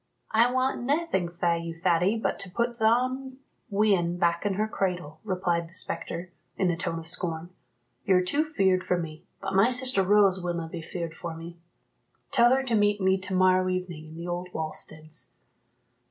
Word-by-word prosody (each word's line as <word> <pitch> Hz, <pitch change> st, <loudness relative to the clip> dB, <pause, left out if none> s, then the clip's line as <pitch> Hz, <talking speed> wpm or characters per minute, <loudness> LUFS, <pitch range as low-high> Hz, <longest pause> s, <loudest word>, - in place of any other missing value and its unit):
"I 230 Hz, +2 st, +4 dB
want 255 Hz, +1 st, 0 dB
naething 275 Hz, -, 0 dB
fae 170 Hz, 0 st, 0 dB
you, 165 Hz, 0 st, -6 dB
Thady, 180 Hz, +5 st, +2 dB
but 220 Hz, -, -1 dB
to 195 Hz, -, -5 dB
put 235 Hz, +5 st, -2 dB
thon 255 Hz, +4 st, +1 dB, 0.3 s
wean 195 Hz, -5 st, +2 dB
back 170 Hz, +2 st, +1 dB
in 195 Hz, -, -1 dB
her 215 Hz, +2 st, 0 dB
cradle," 180 Hz, -7 st, -3 dB
replied 180 Hz, -4 st, -1 dB
the 170 Hz, -, -14 dB
spectre, 170 Hz, +1 st, -4 dB, 0.3 s
in 185 Hz, -2 st, +2 dB
a -, -, -1 dB
tone 165 Hz, 0 st, -3 dB
of 165 Hz, -, -7 dB
scorn. 170 Hz, 0 st, -3 dB, 0.5 s
"You're 185 Hz, -2 st, +3 dB
too 285 Hz, +12 st, +2 dB
feared 190 Hz, -12 st, +1 dB
for 180 Hz, -, +1 dB
me, 160 Hz, -2 st, -6 dB, 0.2 s
but -, -, -3 dB
my 195 Hz, +5 st, +5 dB
sister 255 Hz, -4 st, +3 dB
Rose 195 Hz, -1 st, +4 dB
willna 170 Hz, -2 st, -2 dB
be 170 Hz, -1 st, -6 dB
feared 170 Hz, 0 st, -5 dB
for 165 Hz, 0 st, -6 dB
me 170 Hz, +1 st, -10 dB, 0.7 s
tell 245 Hz, -2 st, +6 dB
her 270 Hz, -, 0 dB
to 250 Hz, -3 st, -2 dB
meet 205 Hz, -1 st, +3 dB
me 190 Hz, 0 st, +2 dB
to 190 Hz, 0 st, -2 dB
morrow 185 Hz, 0 st, +4 dB
evening, 180 Hz, -4 st, -4 dB
in 155 Hz, -, -11 dB
the 170 Hz, +1 st, -6 dB
old 175 Hz, +1 st, -3 dB
wallsteads." 155 Hz, 0 st, -3 dB
185 Hz, 185 wpm, -27 LUFS, 170-215 Hz, 0.7 s, tell